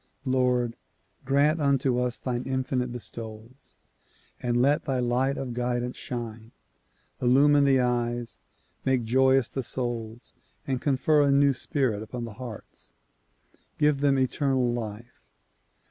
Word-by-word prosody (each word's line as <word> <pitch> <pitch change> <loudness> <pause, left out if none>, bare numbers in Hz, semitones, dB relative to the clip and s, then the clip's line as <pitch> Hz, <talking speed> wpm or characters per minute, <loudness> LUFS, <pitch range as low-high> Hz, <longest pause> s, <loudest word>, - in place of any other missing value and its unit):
Lord! 125 -2 +1 0.5
grant 145 +4 +2
unto 135 -3 +2
us 125 -1 -1
thine 125 -1 -3
infinite 130 -1 -1
bestowals 115 +1 -9 0.7
and 120 -1 0
let 145 +5 +2
thy 135 -4 0
light 125 +3 +1
of 130 -3 -4
guidance 125 0 -2
shine. 115 -2 -6 0.7
Illumine 140 +3 +5
the 135 -2 +4
eyes, 120 -1 -1 0.4
make 130 -2 +1
joyous 130 +2 +3
the 135 - -4
souls 120 -2 -5 0.3
and 130 -2 -2
confer 145 +2 +3
a 140 - +3
new 140 0 +4
spirit 125 -5 -1
upon 120 +2 -6
the 115 - -8
hearts. 115 -1 -10 0.8
Give 150 -2 +2
them 140 -1 +3
eternal 130 -1 +1
life. 115 0 -7
125 Hz, 125 wpm, -27 LUFS, 120-135 Hz, 0.8 s, Illumine